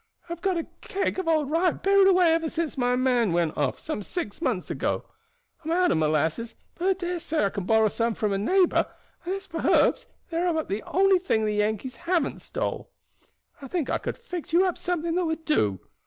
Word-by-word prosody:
I - - -13
have 340 - -10
got 380 -2 +1
a 330 - -2 0.2
keg 385 -1 -2
of 375 - -3
old 310 -3 +2
rye 340 +3 +3
buried 395 +3 +3
away 360 -3 +5
ever 325 -1 0
since 330 -1 -3
my 250 -2 +1
man 250 -6 +2
went 170 -2 +1
off, 140 -3 0
six 305 - -5
months - - -1
ago; - - -2 0.6
I - - -9
am - - -1
out 360 +1 +3
of - - +2
molasses, 155 +9 0 0.2
but 355 - -2
I 385 - +5
dare 355 -1 -3
say 320 -6 -1
I 195 - 0
can 200 -3 -4
borrow 220 +1 +4
some 230 +1 -1
from 210 -2 0
a 195 - 0
neighbor, 365 - +3 0.4
and 370 +2 -1
as 390 0 -7
for 330 -3 -6
herbs - - +3 0.2
they 330 - -2
are 350 +2 +1
about 320 -3 -1
the 200 +3 -2
only 385 0 +4
thing 225 -12 0
the 210 - 0
Yankees 215 +4 -1
haven't 340 -4 -1
stole. - - -4 0.7
I 275 - -7
think 320 0 -2
I - - +1
could - - -4
fix 360 -10 -7
you 360 +3 +5
up 365 - 0
something 340 -2 -2
that 360 +1 +1
would 320 0 -3
do. 105 - +1
320 Hz, 225 wpm, -26 LUFS, 220-360 Hz, 0.7 s, away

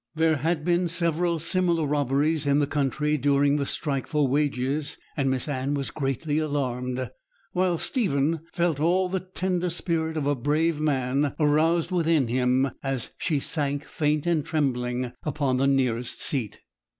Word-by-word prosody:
There 160 -1 +3
had 155 +2 -1
been 175 0 +2
several 170 0 +1
similar 170 0 +2
robberies 145 +2 +1
in 140 0 +4
the 145 - +3
country 150 +1 0
during 140 +1 +3
the 140 -2 -1
strike 140 -4 -2
for 150 -3 +1
wages, 140 +1 0 0.2
and 135 -2 +1
Miss 130 +1 -1
Anne 140 0 -1
was 140 -1 -3
greatly 145 +2 -1
alarmed, 130 -4 -2 0.4
while 180 -1 +1
Stephen 160 - 0
felt 170 -5 0
all 180 +4 +2
the 190 +1 -1
tender 185 -1 -2
spirit 160 -2 -2
of 150 - -1
a 145 - +2
brave 150 +4 0
man 140 -1 0
aroused 160 +3 +2
within 165 -7 +2
him, 130 +2 +2
as 135 -3 -3
she 155 -5 0
sank 145 -1 -2
faint 150 -1 0
and 170 -4 +1
trembling 125 -5 -1
upon 140 -4 0
the 135 +1 +2
nearest 125 -3 0
seat. 125 -8 -2
150 Hz, 155 wpm, -26 LUFS, 135-165 Hz, 0.4 s, in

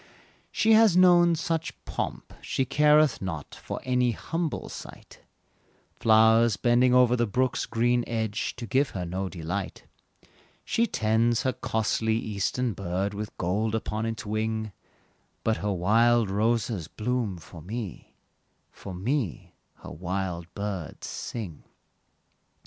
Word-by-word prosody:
She 220 0 +3
has 220 -5 +6
known 175 -2 +6
such 165 -1 -3
pomp, - - -4
she 135 - -1
careth 150 +1 +4
not, 80 -7 -5
For - - -6
any 125 -1 +1
humble 165 +6 -3
sight; - - -11 0.8
Flowers 110 -1 +5
bending 120 +3 +3
o'er 125 -1 +5
the 120 -1 +1
brook's 125 +4 0
green 120 +1 +1
edge, 110 -2 -2
To 120 - -6
her - - -12
give 135 +5 +1
no 90 +1 -3
delight; 90 +3 -5 0.8
She 230 +1 +1
tends 115 - +1
her 130 - +1
costly 110 0 0
eastern 110 +3 -1
bird 95 +1 -2
With 105 +1 -6
gold 105 +5 0
upon 110 0 -2
its 110 -2 -4
wing; 110 0 -2 0.7
But 110 -1 +1
her 105 +1 -2
wild 110 +4 +3
roses 110 -3 0
bloom 110 -2 -2
for 80 0 -12
me, 105 +2 -7 0.6
For 95 - -9
me 115 - -2 0.3
her - - -8
wild 90 -1 -4
birds 100 -6 -5
sing. 100 -10 -6
110 Hz, 125 wpm, -27 LUFS, 100-125 Hz, 0.8 s, has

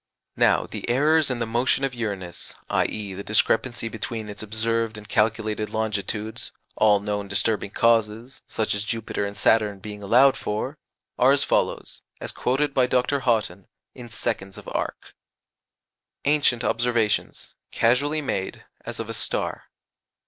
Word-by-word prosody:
Now - - +4
the - - -6
errors 150 +4 +4
in 125 - -1
the 115 - -1
motion 120 +4 +1
of 135 -2 0
Uranus, 100 -7 -5 0.2
i.e. 105 -3 -1
the 100 +2 -6
discrepancy 115 +3 +1
between 110 -1 -5
its 105 - -6
observed 110 +1 -1
and 105 -1 -10
calculated 110 -1 0
longitudes 110 0 -3 0.2
all 105 -2 +5
known 105 0 -3
disturbing 100 +1 0
causes, 115 +3 +1
such 110 - -1
as 100 0 0
Jupiter 110 -2 -2
and 100 0 -6
Saturn, 105 0 +3
being 105 +1 -8
allowed 130 +7 +5
for 130 +6 -3 0.4
are 130 +2 +6
as 140 - +3
follows - - -1 0.2
(as - - -4
quoted 135 +3 0
by 130 -2 +3
Dr. 125 +3 +1
Haughton) 110 -7 0 0.3
in 120 -2 -10
seconds 105 -3 -3
of 105 - -11
arc: - - -4 1.1
ANCIENT 140 -5 +3
OBSERVATIONS 120 -3 0 0.2
(casually 145 +6 +2
made, 95 -8 -3 0.2
as - - -6
of - - -4
a - - -5
star). - - -1
110 Hz, 145 wpm, -24 LUFS, 105-125 Hz, 1.1 s, are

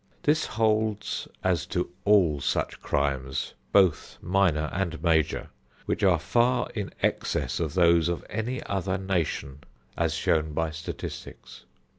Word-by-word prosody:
This 155 +1 +2
holds 110 -2 0 0.2
as 90 -2 +1
to 90 -1 -2
all 90 -9 +4
such - - -1
crimes, 70 -1 -1 0.2
both 95 -6 +3
minor 90 -4 +2
and 85 -4 -2
major, 80 -3 +1 0.4
which - - -1
are - - +5
far 125 +1 +1
in 105 -3 -4
excess - - 0
of 80 -4 -2
those 85 -2 +4
of 85 - -3
any 115 +4 -3
other 95 -1 -1
nation, 85 -7 -2 0.4
as - - 0
shown 80 -1 +1
by 80 +1 -1
statistics. 80 +1 -8
90 Hz, 130 wpm, -27 LUFS, 80-100 Hz, 0.4 s, are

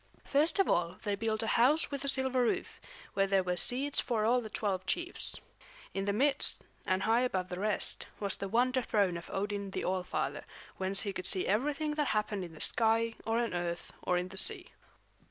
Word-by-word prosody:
First 300 +6 +2
of 390 - +3
all 175 +1 0
they 205 - -1
built 220 +1 -1
a 225 - +1
house 295 +7 +3
with 280 -1 -4
a - - -4
silver 265 -2 +2
roof, 240 - -1 0.3
where 195 0 +2
there 195 -1 +2
were 180 0 -1
seats 265 +9 +3
for 220 -4 0
all 245 +2 +3
the 220 - -8
twelve 195 -3 -2
chiefs. 350 +1 -2 0.6
In 195 0 -2
the 200 - +1
midst, 275 +7 +2 0.2
and 185 +1 +1
high 230 +2 +3
above 185 -8 -1
the 180 - -5
rest, 210 +1 -1
was 200 -2 -1
the 195 - -5
wonder 255 +4 +2
throne 200 -6 +1
of 170 - -8
Odin 200 0 -3
the - - -4
All 185 0 0
Father, 180 - -3 0.3
whence 190 +1 +1
he 200 -2 -3
could 185 -1 -3
see 185 - +1
everything 285 +8 0
that 300 -2 0
happened 210 -2 -2
in 170 -2 -9
the - - -10
sky 225 0 +2
or 225 +1 +1
on 235 -1 0
the 180 - -2
earth 175 0 -4
or 180 - +1
in 180 +1 -3
the 190 - -7
sea. - - +4
210 Hz, 215 wpm, -31 LUFS, 190-250 Hz, 0.6 s, sea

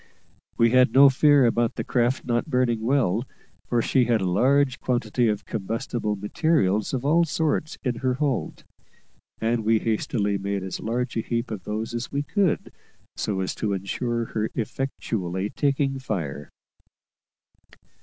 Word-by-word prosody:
We 115 -1 +4
had 125 -2 +4
no 140 +1 +9
fear 145 0 +5
about 115 0 +1
the - - -3
craft 120 +1 0
not 120 +2 0
burning 125 -5 +1
well, 120 -3 +1 0.4
for 120 -2 +1
she 130 -3 +2
had 115 -2 +2
a 95 - -1
large 130 +8 +2
quantity 120 -1 0
of 105 -2 -1
combustible 115 0 -3
materials 105 - +1
of 130 0 -3
all 165 +4 +4
sorts 155 -1 -1
in 125 -4 -1
her 130 0 0
hold; 140 -2 -2 0.8
and 115 0 0
we 110 +1 +3
hastily 105 -2 -1
made 100 0 -2
as 95 - -5
large 120 +2 -2
a - - +1
heap 115 +1 -3
of 100 -4 -6
these 110 +3 -3
as 120 +1 -4
we 140 +1 -1
could, 190 +2 0 0.4
so 100 -3 -2
as 95 - -2
to 105 -2 -2
ensure 115 +5 -2
her 110 0 -1
effectually 105 -6 -3
taking 140 -1 0
fire. 80 - -4
120 Hz, 155 wpm, -25 LUFS, 105-130 Hz, 0.8 s, no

